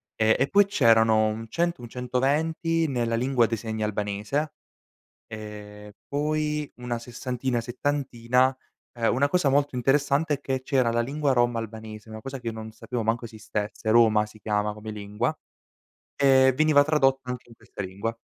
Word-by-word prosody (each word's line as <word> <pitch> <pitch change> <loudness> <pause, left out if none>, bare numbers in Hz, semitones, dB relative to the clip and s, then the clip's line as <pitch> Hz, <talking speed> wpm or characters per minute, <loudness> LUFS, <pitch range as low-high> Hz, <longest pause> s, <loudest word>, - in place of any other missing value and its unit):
Ehm, 110 0 +3
e - - +2
poi 200 0 +5
c'erano 115 - +4
un 110 +1 -4
100, 170 0 -1
un 120 - -7
120 150 +7 0
nella 120 -4 -1
lingua 125 0 +2
dei 115 - -1
segni 110 0 -4
albanese, 105 +9 -2 0.7
e 105 -1 -9
poi 150 0 -1
una 125 -1 -3
sessantina, 125 0 -3
settantina 125 0 0 0.4
ehm, 115 -1 +1
una 140 +4 +2
cosa 175 -3 +2
molto 140 0 +2
interessante 140 +4 +2
è 140 - -7
che 130 -2 -2
c'era 130 -3 +2
la 120 - +1
lingua 140 +3 0
Rom 120 -1 +2
albanese, 110 -1 -7
una 110 0 -7
cosa 135 +3 -6
che 120 - -13
io 115 - -1
non 110 0 -7
sapevo 115 +1 -5
manco 115 +2 0
esistesse, 110 -1 -4
Roma 110 -2 +5
si 110 0 -16
chiama 105 0 -1
come 110 +1 -8
lingua, 105 0 -2 0.8
e 130 -1 +5
veniva 155 -2 +5
tradotto 135 -4 +2
anche 125 -1 -5
in 115 - -15
questa 105 - -8
lingua. 100 +5 -4
120 Hz, 165 wpm, -26 LUFS, 110-140 Hz, 0.8 s, poi